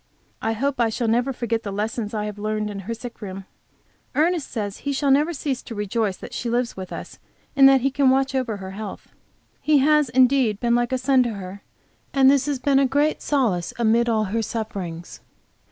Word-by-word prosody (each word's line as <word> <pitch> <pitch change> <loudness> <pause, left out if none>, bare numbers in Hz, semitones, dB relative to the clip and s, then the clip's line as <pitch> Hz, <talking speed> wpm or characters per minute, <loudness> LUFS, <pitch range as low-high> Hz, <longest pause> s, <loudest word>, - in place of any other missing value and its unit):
I 225 - 0
hope 275 +4 -2
I 230 - +3
shall 230 +1 -2
never 240 +4 +1
forget 230 -3 -2
the 205 - -5
lessons 210 +1 -3
I 210 -1 -2
have 210 -1 -6
learned 215 0 -2
in 200 - -6
her - - 0
sick 240 +1 -9
room. 195 -1 -7 0.7
Ernest 325 -1 +1
says 205 -3 -4
he 285 - -2
never 290 +5 +4
shall 315 - -7
cease 270 -4 -2
to 230 - -9
rejoice 210 -1 -1
that - - -10
she 240 - -3
lives 240 +1 -1
with 190 -1 -7
us, - - -8 0.4
and 270 0 +8
that 270 -1 +4
he 275 +2 +1
can 275 0 +3
watch 270 +1 +2
over 255 -5 -1
her 190 -1 -7
health. 210 +2 -8 0.5
He, 305 -1 +4
has 300 0 +3
indeed 250 -3 +3
been 235 -1 +1
like 240 0 +1
a 260 - +1
son 260 0 +3
to 240 -2 -1
her, 195 0 -8 0.5
and 270 -1 +6
this 280 0 +2
has 290 -2 0
been 270 +1 +2
a 275 - +4
great 290 +3 +1
solace 220 - 0
amid 235 +1 +2
all 220 -2 +2
her 215 +3 -1
sufferings. 195 -7 -5
235 Hz, 215 wpm, -23 LUFS, 210-270 Hz, 0.7 s, and